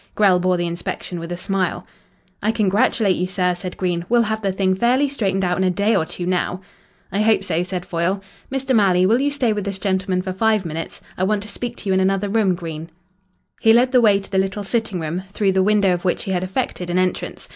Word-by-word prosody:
Grell 195 -4 +4
bore 180 0 +1
the 175 - -1
inspection 170 +1 -4
with 170 +1 -7
a 175 - -3
smile. 185 -1 -2 0.6
"I 215 - +2
congratulate 205 -1 +2
you, 180 - -1
sir," 180 -1 0
said 180 +1 -7
Green. 175 -2 -1
"We'll 240 0 +4
have 220 0 -2
the 195 -2 0
thing 190 0 +1
fairly 245 +8 +2
straightened 195 -8 -1
out 180 +1 0
in - - +2
a 185 - +3
day 205 +4 +1
or 160 - +1
two 175 +1 -5
now." 180 0 -1 0.5
"I 200 - 0
hope 215 -2 +3
so," 170 -3 0
said 180 0 -4
Foyle. 175 +3 -1 0.3
"Mr. 265 -1 0
Malley, 185 -4 +4
will 230 +6 +3
you 285 - +2
stay 260 -6 +1
with 205 -1 -3
this 200 -1 -3
gentleman 190 -1 -1
for 185 -1 -3
five 215 0 +1
minutes? 165 0 -5 0.2
I - - +1
want 205 +1 +1
to 210 - -9
speak 240 +4 -5
to - - -9
you - - +3
in 190 - +3
another 195 +1 +1
room, 200 -3 +2
Green." 165 -2 -7 0.7
He 225 - +5
led 250 +2 +4
the 250 -2 +5
way 210 -3 +5
to 195 - -9
the 190 - +2
little 195 +2 -1
sitting 220 -2 -1
room, 165 +3 -3
through 200 -3 +1
the 190 0 +2
window 200 -1 +3
of 175 0 -3
which 180 - 0
he 195 - -4
had 180 -1 0
effected 185 -2 -3
an 175 - 0
entrance. 185 0 -2
190 Hz, 245 wpm, -21 LUFS, 180-215 Hz, 0.7 s, He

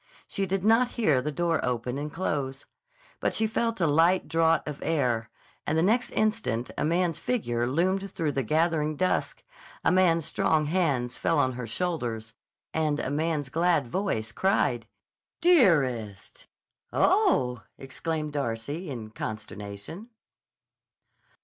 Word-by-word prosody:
She 195 -1 -2
did 195 +1 -1
not 225 +3 +5
hear 155 - +3
the 150 - -3
door 165 0 0
open 125 +1 -2
and 150 +1 -4
close. 140 -6 -3 0.5
But - - 0
she 220 - +2
felt 225 0 -1
a 170 - +2
light 165 +5 +3
draught 165 0 +2
of 150 -2 -6
air, 125 -8 0 0.4
and 155 - +1
the 160 - +3
next 230 +6 +2
instant 215 - 0
a - - -1
man's 170 +1 +1
figure 120 - -1
loomed 185 +8 0
through 160 -5 -2
the 135 - -1
gathering 155 +3 +1
dusk, 185 +5 -1 0.4
a - - +3
man's 170 -4 +3
strong 155 -1 +1
hands 145 -7 0
fell 165 - +1
on 130 -3 +3
her 125 -1 -5
shoulders, 115 -7 -3 0.4
and 155 -2 0
a 130 - -2
man's 150 -2 -1
glad 165 -1 +2
voice 120 - -2
cried: 145 - +1 0.5
"Dearest!" 165 - +2 0.4
"Oh!" 345 - +2 0.2
exclaimed 150 +3 -4
Darcy 145 +5 -3
in 115 -5 -6
consternation. 105 - -7
155 Hz, 135 wpm, -27 LUFS, 125-180 Hz, 0.5 s, not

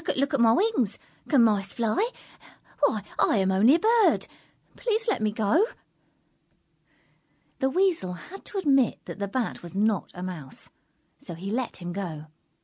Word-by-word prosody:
"Look 280 +3 0
at 280 - +2
my 225 -1 +6
wings. 355 - +1 0.3
Can 275 -6 +5
Mice 200 -3 +1
fly? 235 - 0 0.7
Why, 220 -8 +2 0.2
I - - +3
am 190 -1 +2
only 215 +10 +5
a - - +1
Bird! 450 +3 +3 0.5
Please 450 -1 -1
let 435 - +1
me 215 -1 +1
go!" 215 - +2 2.0
The 265 - +2
Weasel 340 - +1
had 360 - -11
to 410 - -6
admit 275 - +3
that - - -8
the 200 - -2
Bat 235 +3 -3
was 175 +1 -10
not 210 -1 +1
a 180 - -6
Mouse, 165 -8 -6 0.5
so 170 - -8
he 190 +4 -6
let 235 -6 -3
him 175 0 -4
go. 170 -6 -5
225 Hz, 160 wpm, -26 LUFS, 195-310 Hz, 2.0 s, my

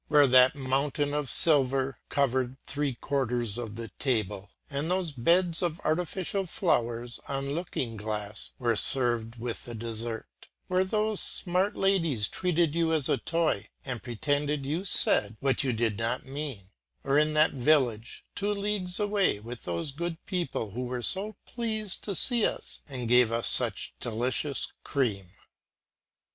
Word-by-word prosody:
Where 145 -1 +6
that 130 +1 +5
mountain 140 +2 -1
of 150 -3 -1
silver 135 -3 +4
covered 130 -2 0
three 140 -2 -2
quarters 120 -4 -2
of 110 -3 -6
the 115 0 -6
table 105 -6 -2 0.2
and 145 +2 -3
those 180 -3 0
beds 170 +6 +2
of 170 -3 -2
artificial 180 +4 -1
flowers 120 - -1
on 140 0 -3
looking 140 -8 -3
glass 105 0 -4
were 120 -3 0
served 120 -2 +4
with 115 0 -5
the 120 - -7
dessert, 115 0 -5 0.2
where 185 0 +1
those 215 +2 -1
smart 185 +2 0
ladies 165 - +1
treated 175 - 0
you 165 -1 +1
as 155 -4 +1
a - - +1
toy 165 -11 -1 0.2
and 125 -4 -4
pretended 145 +4 -2
you 160 +7 -2
said 105 - +5
what 135 +1 +1
you 130 - 0
did 110 -2 -1
not 115 +3 -1
mean; 135 -9 -7 0.3
or 140 +1 +2
in 155 0 +1
that 155 +1 +4
village 125 -5 0
two 205 +2 -1
leagues 200 -3 -2
away, 205 - +1
with 115 +3 -9
those 85 +9 -3
good 165 +3 -4
people 170 - -3
who 125 +5 -4
were 125 -1 -4
so 200 - 0
pleased 220 -4 -3
to 200 - -3
see 240 +4 +4
us - - -1
and 125 -3 -5
gave 125 -1 +4
us 115 0 0
such - - +4
delicious 125 +5 -2
cream?" 110 -10 -1
135 Hz, 155 wpm, -28 LUFS, 120-170 Hz, 0.3 s, Where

